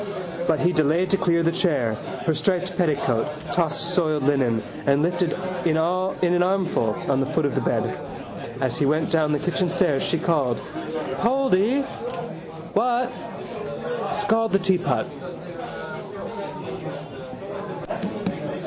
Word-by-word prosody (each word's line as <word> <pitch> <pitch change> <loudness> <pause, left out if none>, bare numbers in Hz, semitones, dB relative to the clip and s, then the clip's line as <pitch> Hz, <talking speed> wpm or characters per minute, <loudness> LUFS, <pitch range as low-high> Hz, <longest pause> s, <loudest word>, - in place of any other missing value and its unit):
But 160 -2 +3
he 175 +1 +3
delayed 155 +4 +3
to 195 - +5
clear 170 -3 +3
the 165 - +3
chair: 150 - +2 0.3
her 160 - +3
striped 185 +2 +1
petticoat, 150 -9 +2 0.2
tossed 170 0 +1
soiled 155 -5 +2
linen: 130 -5 +2 0.2
and 140 +2 +4
lifted 175 0 +1 0.4
all 185 +4 +1
in 175 0 +4
an 175 - +4
armful 180 - +2
on 135 - +3
to - - +3
the - - -5
foot 160 - +2
of 145 - +1
the - - +1
bed. - - 0 0.6
As 130 -3 +1
he 145 - +3
went 155 +3 +2
down 155 -2 +3
the 150 - +3
kitchen 180 +3 0
stairs 175 -6 +2
she 165 - +1
called: 150 -8 +1 0.6
—Poldy! 255 0 +3 0.9
—What? 245 +1 +2 1.0
—Scald 220 +2 +2
the - - +7
teapot. 185 -1 +2
170 Hz, 130 wpm, -24 LUFS, 150-185 Hz, 1.0 s, the